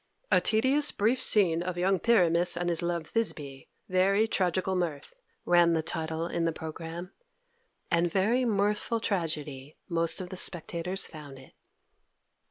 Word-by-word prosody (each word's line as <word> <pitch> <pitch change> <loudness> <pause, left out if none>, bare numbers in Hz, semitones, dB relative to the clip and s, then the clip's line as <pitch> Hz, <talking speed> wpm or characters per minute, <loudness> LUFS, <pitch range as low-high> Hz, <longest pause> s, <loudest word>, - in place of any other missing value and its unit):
"A - - +5
tedious 260 +7 +3
brief 235 +5 +1
scene 180 -9 +2
of 180 0 -4
young 190 +1 +1
Pyramus 175 -5 +3
and 175 0 -1
his 170 -2 +1
love 170 -2 -3
Thisbe: 145 -12 -2 0.2
very 195 +4 +2
tragical 185 -1 0
mirth," 170 - -3 0.3
ran 175 -1 +4
the 160 -1 0
title 160 0 -3
in 170 0 -2
the 165 - +1
programme, 165 +3 -7 0.8
and 170 0 +2
very 220 +8 +2
mirthful 210 0 0
tragedy 155 -9 -3
most 165 -1 -1
of 180 -1 -6
the 185 - -7
spectators 175 +1 0
found 145 -4 -10
it. 130 - -16
175 Hz, 145 wpm, -28 LUFS, 165-195 Hz, 0.8 s, A